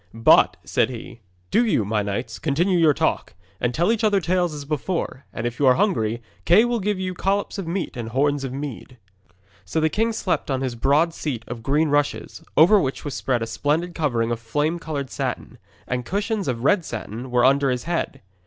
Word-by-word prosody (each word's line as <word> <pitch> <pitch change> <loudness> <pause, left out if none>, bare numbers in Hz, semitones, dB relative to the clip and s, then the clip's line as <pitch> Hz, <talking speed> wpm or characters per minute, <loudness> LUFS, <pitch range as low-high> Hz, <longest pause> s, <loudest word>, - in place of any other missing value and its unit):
'But,' 115 - +5
said - - +1
he, 120 -1 -9 0.3
'do 235 - +4
you, 195 - +1
my 105 +1 0
knights, 105 +3 -4
continue 170 +5 +1
your 160 -2 +6
talk, 140 - -1 0.2
and 120 - 0
tell 170 - +2
each 230 0 -1
other 205 -2 +4
tales 175 0 +1
as 145 -2 -7
before, 150 -2 -3
and 115 - -5
if 120 0 -3
you 140 - +4
are 130 - +6
hungry, 120 - 0 0.2
Kay 205 - +5
will 240 -1 0
give 205 -1 -1
you 185 -1 -2
collops 200 +2 -1
of 185 - -5
meat 175 +2 -3
and 115 -2 -5
horns 140 +3 +1
of 135 - -4
mead.' 135 -2 -7 0.7
So 90 - -2
the 160 0 +2
king 225 +2 +1
slept 205 -8 -2
on 135 -1 0
his 130 -2 -2
broad 145 +8 +2
seat 130 -8 -4
of 120 -1 -6
green 150 +6 +1
rushes, 145 0 -1
over 185 +7 +7
which 135 0 -3
was 145 - -3
spread 125 -3 -1
a - - -1
splendid 155 +9 -1
covering 120 -8 0
of 115 - -2
flame 150 +9 -1
coloured 145 -5 -4
satin. - - -4 0.3
And 125 0 -2
cushions 205 - -2
of 120 -2 -2
red 180 +5 +3
satin 120 -1 -6
were 125 0 +3
under 140 +1 +4
his 125 -1 -1
head. 165 -5 -3
145 Hz, 210 wpm, -23 LUFS, 125-175 Hz, 0.7 s, over